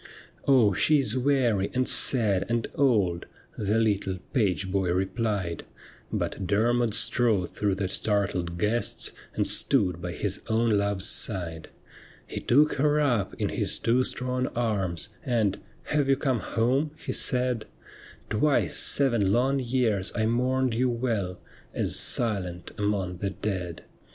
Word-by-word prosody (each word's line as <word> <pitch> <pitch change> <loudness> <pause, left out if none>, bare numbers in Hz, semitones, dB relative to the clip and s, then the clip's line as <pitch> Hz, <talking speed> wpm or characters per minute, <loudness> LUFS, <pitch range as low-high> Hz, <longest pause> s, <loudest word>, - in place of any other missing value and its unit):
' - - -27
Oh, 125 -7 +5
she 150 +10 +3
is 135 -2 0
weary, 125 -7 +1
and 130 0 +1
sad, 105 -7 +2
and 115 -1 0
old,' 105 -11 +1 0.3
The 105 +1 0
little 100 -4 0 0.2
page 95 -6 0
boy 95 -2 0
replied; 95 -2 -2 0.5
But 95 - -3
Dermod 115 +2 +1
strode 115 -5 +1
through 100 -2 -1
the 95 0 -2
startled 95 -4 0
guests, 105 +6 -1 0.2
And - - +1
stood 90 -3 +2
by 90 0 -4
his 100 +1 -2
own 115 +1 +1
love's 100 -2 +1
side. 85 -8 0 0.6
He - - -6
took 150 +5 +3
her 150 0 +3
up 120 -10 0
in - - -2
his - - 0
two 120 +2 +2
strong 130 0 -1
arms, 95 -9 -1
And, 110 -6 0
' - - -31
Have 145 -2 +1
you 135 - +5
come 130 -3 0
home? 130 +9 0
' - - -26
he - - -2
said; 125 -2 +1 0.3
' - - -21
Twice 140 +7 +1
seven 120 -9 +2
long 130 +5 +2
years 120 -6 0
I 110 - +1
mourned 125 +2 +1
you 125 +3 +1
well 115 -7 -2 0.4
As - - -1
silent 90 -7 -1
among 100 -3 -2
the 100 +2 -2
dead.' 90 -4 -4
110 Hz, 150 wpm, -26 LUFS, 95-125 Hz, 0.6 s, Oh